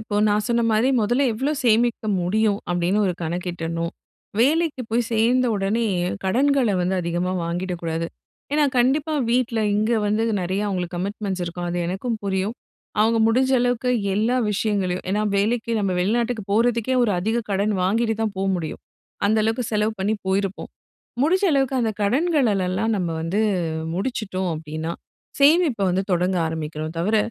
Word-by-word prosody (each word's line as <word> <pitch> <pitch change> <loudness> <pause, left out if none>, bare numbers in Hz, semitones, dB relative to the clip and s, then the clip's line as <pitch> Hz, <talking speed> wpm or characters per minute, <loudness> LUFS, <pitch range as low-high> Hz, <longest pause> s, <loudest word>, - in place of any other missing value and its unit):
இப்போ 220 -1 -6
நா - - +3
சொன்ன 235 -1 +1
மாரி 220 +4 +3
மொதல்ல 240 +6 +2
எவ்ளோ 270 +7 -1
சேமிக்க 230 -1 +2 0.2
முடியும், 205 +3 +1
அப்படின்னு 175 +3 +1
ஒரு 185 - +1
கணக்கிடணும். 170 -1 -3 0.5
வேலைக்கு 300 +1 +2
போய் 235 +1 +1
சேர்ந்த 240 +3 +3
உடனே, 205 +4 0 0.4
கடன்கள 260 +4 +2
வந்து 180 +2 0
அதிகமா 175 +1 -1
வாங்கிடக்கூடாது. 170 -1 -3 0.5
ஏன்னா, 300 0 +3
கண்டிப்பா 280 +6 +2 0.2
வீட்ல 240 -1 +1 0.2
இங்க 215 +3 +1
வந்து, 210 +2 +1 0.2
நெறைய 185 +3 -1
அவுங்களுக்கு 180 -2 -3
கமிட்மெண்ட்ஸ் 195 0 -3
இருக்கும், 175 +1 -4
அது 175 - -2
எனக்கும் 195 +7 -2
புரியும். 195 +2 -1 0.5
அவுங்க 225 +1 +3
முடிஞ்ச 260 +4 +2
அளவுக்கு 245 0 0 0.3
எல்லா 220 +5 +1 0.2
விஷயங்களையும் 200 -3 -1
ஏன்னா 210 +2 +1
வேலைக்கு 225 +3 0
நம்ம 195 -3 0
வெளிநாட்டுக்கு 230 +4 0
போறதுக்கே, 235 +3 +2
ஒரு 235 - +2
அதிக 220 +6 0
கடன் 200 +2 +1
வாங்கிட்டுதான் 225 +1 0
போ 190 - -2
முடியும். 160 -3 -5 0.5
அந்த 215 +2 +3
அளவுக்கு 225 +3 0
செலவு 210 +1 +1
பண்ணி 205 +3 +1
போயிருப்போம். 195 0 -1 0.5
முடிஞ்ச 370 +7 +2
அளவுக்கு 270 -1 +1
அந்த 225 -2 +1
கடன்களலெல்லாம் 220 - +1
நம்ம 180 -3 -1
வந்து 175 +6 0 0.5
முடிச்சுட்டோம் 190 -3 -2
அப்படின்னா, 155 +1 -5 0.5
சேமிப்ப 295 - +4
வந்து 185 +2 +1
தொடங்க 180 +1 +1
ஆரம்பிக்கணும் 160 0 -4
தவிர, 205 +6 +1
210 Hz, 145 wpm, -23 LUFS, 180-235 Hz, 0.5 s, சேமிப்ப